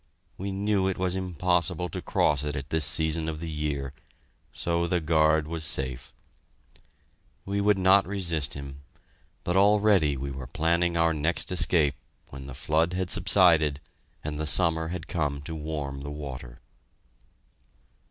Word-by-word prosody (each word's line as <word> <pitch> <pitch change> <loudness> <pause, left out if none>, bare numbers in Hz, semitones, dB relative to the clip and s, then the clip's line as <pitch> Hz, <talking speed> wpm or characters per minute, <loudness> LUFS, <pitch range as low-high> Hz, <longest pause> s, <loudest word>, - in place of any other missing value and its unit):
We 100 +1 -5
knew 100 0 0
it 95 - -2
was 90 0 -1
impossible 90 -1 -1
to - - -6
cross 75 -1 +1
it 75 -1 -3
at 70 +1 -6
this 80 -2 +3
season 80 +2 +2
of 75 -1 -5
the 85 - -6
year, 75 -3 -3 0.6
so 85 0 -1
the 90 +1 0
guard 80 -1 +2
was 80 0 -5
safe. 65 -4 +1 1.3
We 100 +1 -2
would 105 0 +3
not 95 +1 +4
resist 85 -8 -1
him, 70 0 -9 0.6
but 90 - -2
already 100 -7 +3
we 70 +1 -5
were 65 -1 -7
planning 85 +3 0
our 85 0 +2
next 80 +4 -1
escape 80 -5 +3 0.4
when 65 0 -10
the 65 - -9
flood 80 +4 0
had 90 -1 -2
subsided 85 -6 +3 0.4
and 75 0 -5
the 80 - -2
summer 80 +1 +3
had 85 -1 -6
come 75 -4 -2
to 80 - -7
warm 75 -3 -5
the 70 - -6
water. 65 -5 -8
80 Hz, 150 wpm, -26 LUFS, 75-90 Hz, 1.3 s, not